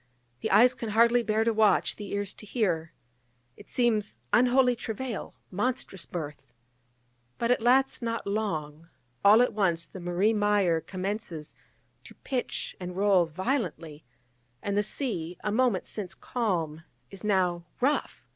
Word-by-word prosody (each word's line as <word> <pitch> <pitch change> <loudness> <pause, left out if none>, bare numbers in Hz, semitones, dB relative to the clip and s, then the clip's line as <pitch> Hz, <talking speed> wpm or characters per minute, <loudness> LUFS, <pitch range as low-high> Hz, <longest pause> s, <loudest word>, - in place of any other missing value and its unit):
the - - -2
eyes 240 +6 +6
can 230 -3 -5
hardly 235 +3 +4
bear 220 0 +1
to 230 0 +2
watch, 215 -1 +3
the 205 -2 -8
ears 200 -1 -2
to - - -12
hear! 180 -7 -1 0.6
it - - -15
seems 220 - +1 0.2
unholy 250 0 +4
travail, 235 0 -5 0.2
monstrous 200 -2 -2
birth! 150 -4 -6 0.9
But 235 +1 +1
it 245 - +2
lasts 260 +4 +3
not 230 -1 -2
long: 165 -7 -3 0.3
all 215 +4 +7
at 250 - 0
once 175 -5 +1
the 190 - -10
Marie 175 +5 +1
Meyer 205 -6 +2
commences 185 -4 -5 0.5
to - - -13
pitch 255 -2 -3
and 180 0 -6
roll 195 -4 +4
violently, 170 - -3 0.6
and 200 -1 -1
the 205 - +3
sea, 205 - -3
a 210 - 0
moment 235 -4 +2
since 190 -3 -5
calm, 170 - -2 0.3
is 195 - -10
now 180 -4 +1
rough! 280 +4 0
205 Hz, 145 wpm, -28 LUFS, 175-235 Hz, 0.9 s, all